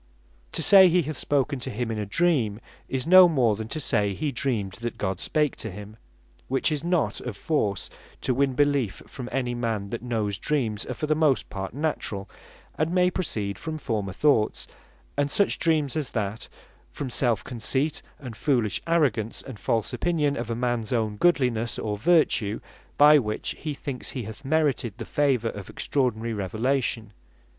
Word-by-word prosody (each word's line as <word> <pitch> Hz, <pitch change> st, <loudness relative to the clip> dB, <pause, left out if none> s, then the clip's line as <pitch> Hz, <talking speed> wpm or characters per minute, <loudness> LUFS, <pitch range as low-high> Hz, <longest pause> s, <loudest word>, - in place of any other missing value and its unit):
To -, -, +1 dB
say 190 Hz, -2 st, +8 dB
he 175 Hz, 0 st, +3 dB
hath 155 Hz, +1 st, -4 dB
spoken 140 Hz, 0 st, 0 dB
to -, -, -4 dB
him 115 Hz, +2 st, -3 dB
in 110 Hz, -, -3 dB
a 105 Hz, -, -3 dB
Dream, 120 Hz, -, +1 dB, 0.3 s
is 130 Hz, -2 st, -1 dB
no 185 Hz, +1 st, +8 dB
more 125 Hz, -9 st, +2 dB
than 110 Hz, +1 st, -5 dB
to 155 Hz, -, -4 dB
say 105 Hz, -8 st, +1 dB
he 150 Hz, +5 st, -2 dB
dreamed 115 Hz, -9 st, -1 dB
that 120 Hz, -1 st, -4 dB
God 95 Hz, -2 st, -2 dB
spake 150 Hz, +3 st, +1 dB
to 110 Hz, -, -4 dB
him; 105 Hz, +2 st, -9 dB, 0.5 s
which 135 Hz, +4 st, +1 dB
is 150 Hz, -1 st, -2 dB
not 175 Hz, -2 st, 0 dB
of 120 Hz, -5 st, -6 dB
force 105 Hz, -, -1 dB, 0.3 s
to 130 Hz, -, 0 dB
win 135 Hz, 0 st, +1 dB
beleef 140 Hz, -7 st, +1 dB
from 125 Hz, -2 st, -8 dB
any 125 Hz, -2 st, -1 dB
man, 115 Hz, -4 st, -2 dB
that 120 Hz, -, -4 dB
knows 110 Hz, -5 st, -2 dB
dreams 115 Hz, -9 st, -1 dB
are -, -, -4 dB
for -, -, -3 dB
the 155 Hz, -, +2 dB
most 150 Hz, -4 st, +1 dB
part 95 Hz, +2 st, -5 dB
naturall, 140 Hz, -10 st, -2 dB, 0.5 s
and 155 Hz, +2 st, +1 dB
may 180 Hz, 0 st, +3 dB
proceed 105 Hz, -, -3 dB
from 160 Hz, -1 st, -4 dB
former 110 Hz, -9 st, -2 dB
thoughts; 110 Hz, 0 st, +2 dB, 0.5 s
and 145 Hz, 0 st, +1 dB
such 200 Hz, +7 st, +3 dB
dreams 155 Hz, -4 st, +1 dB
as 155 Hz, -4 st, -1 dB
that, 105 Hz, -1 st, -3 dB, 0.4 s
from 135 Hz, -3 st, -6 dB
selfe 120 Hz, -2 st, +1 dB
conceit, 130 Hz, +5 st, -1 dB, 0.2 s
and 125 Hz, -5 st, -8 dB
foolish 120 Hz, -6 st, 0 dB
arrogance, 130 Hz, -10 st, +1 dB
and 130 Hz, -6 st, -9 dB
false 115 Hz, +4 st, -1 dB
opinion 150 Hz, +2 st, 0 dB
of 120 Hz, -3 st, -4 dB
a 115 Hz, -, -1 dB
mans 120 Hz, -2 st, -1 dB
own 110 Hz, -4 st, 0 dB
godlinesse, 125 Hz, -9 st, +2 dB
or 105 Hz, -, -2 dB
other 105 Hz, -, -6 dB
vertue, 150 Hz, -11 st, +3 dB, 0.4 s
by 150 Hz, +1 st, +8 dB
which 105 Hz, -4 st, -3 dB
he 155 Hz, -2 st, -4 dB
thinks 135 Hz, -3 st, -5 dB
he 125 Hz, -, -4 dB
hath 110 Hz, +6 st, -9 dB
merited 135 Hz, -7 st, 0 dB
the -, -, -6 dB
favour 135 Hz, -6 st, +1 dB
of 100 Hz, -3 st, -8 dB
extraordinary 115 Hz, -4 st, -1 dB
Revelation. 110 Hz, +2 st, -1 dB
125 Hz, 180 wpm, -26 LUFS, 110-150 Hz, 0.5 s, say